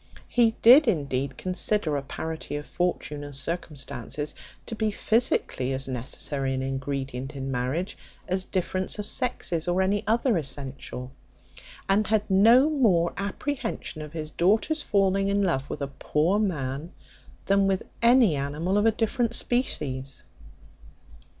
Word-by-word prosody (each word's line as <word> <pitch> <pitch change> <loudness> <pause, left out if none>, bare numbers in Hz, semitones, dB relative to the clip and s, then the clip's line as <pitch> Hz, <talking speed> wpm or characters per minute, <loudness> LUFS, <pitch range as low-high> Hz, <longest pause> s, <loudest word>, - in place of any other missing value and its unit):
He 230 -2 +3
did 255 +5 +8
indeed 140 - -1
consider 185 -3 0
a 140 - -1
parity 160 +3 -5
of 145 0 -5
fortune 160 -4 -2
and 145 -1 -8
circumstances 145 -2 -3 0.3
to - - -6
be 220 0 0
physically 205 - +1
as 135 +1 -2
necessary 135 +2 -2
an 130 - -2
ingredient 135 0 -4
in 135 0 -4
marriage, 130 +9 -2 0.3
as 185 0 +1
difference 185 +1 -2
of 210 - -3
sexes, 205 -10 -1
or 175 +1 +1
any 200 +2 +1
other 230 0 +2
essential; 135 -3 -5 0.8
and 195 +1 +2
had 215 -1 +1
no 230 +8 +6
more 215 - +2
apprehension 200 - -4
of 150 0 -8
his 155 -2 -5
daughter's 220 - +2
falling 195 -4 +2
in 200 0 +1
love 140 -7 0
with - - -4
a - - -2
poor 170 +7 +1
man, 150 -5 -2 0.5
than 195 0 +3
with 190 -1 0 0.2
any 235 - +5
animal 150 +8 -1
of 210 - +3
a - - +5
different 230 +2 0
species. 140 - -1
175 Hz, 140 wpm, -26 LUFS, 140-210 Hz, 0.8 s, did